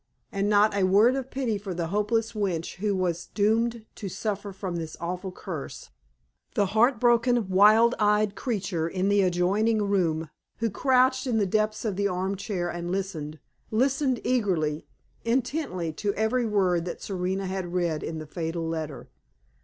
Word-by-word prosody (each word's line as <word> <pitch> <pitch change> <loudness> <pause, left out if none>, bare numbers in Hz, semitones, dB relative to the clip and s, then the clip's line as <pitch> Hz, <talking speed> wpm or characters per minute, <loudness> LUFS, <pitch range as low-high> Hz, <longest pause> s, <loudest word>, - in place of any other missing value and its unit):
And 200 +1 0
not 210 0 +4
a 200 - +1
word 205 +7 +5
of 265 -1 -4
pity 245 -7 -1
for 195 -3 -5
the 165 -1 -2
hopeless 225 +3 0
wretch 185 -7 -2
who 205 +1 0
was 175 -2 -1
doomed 225 +2 +1
to 200 - -6
suffer 205 +1 -3
from 185 -2 -4
this 160 -2 -6
awful 180 +2 -4
curse; - - -7 0.6
the 205 -4 +3
heart 235 +2 +4
broken, 240 -2 +3
wild 215 +5 +6
eyed 210 -1 +3
creature 190 -9 -2
in 185 +3 -1
the 205 0 +4
adjoining 195 +5 +2
room, 165 -6 0 0.3
who 230 -1 -1
crouched 260 +3 +2
in 235 -3 +1
the 210 - +2
depths 215 +3 0
of 205 -4 -1
the 200 0 +2
arm 190 +1 -1
chair 190 -3 -3
and 175 0 -4
listened 165 -6 -3 0.3
listened 260 +2 +1
eagerly, 175 -11 0 0.4
intently, 235 - -1
to 200 +5 -2
every 225 +3 +1
word 185 -5 +1
that 180 - -5
Serena 190 0 -2
had 185 -2 -3
read 170 -4 0
in 160 - -4
the 155 - -6
fatal 165 +1 -3
letter. 160 -3 -4
200 Hz, 165 wpm, -26 LUFS, 180-225 Hz, 0.6 s, wild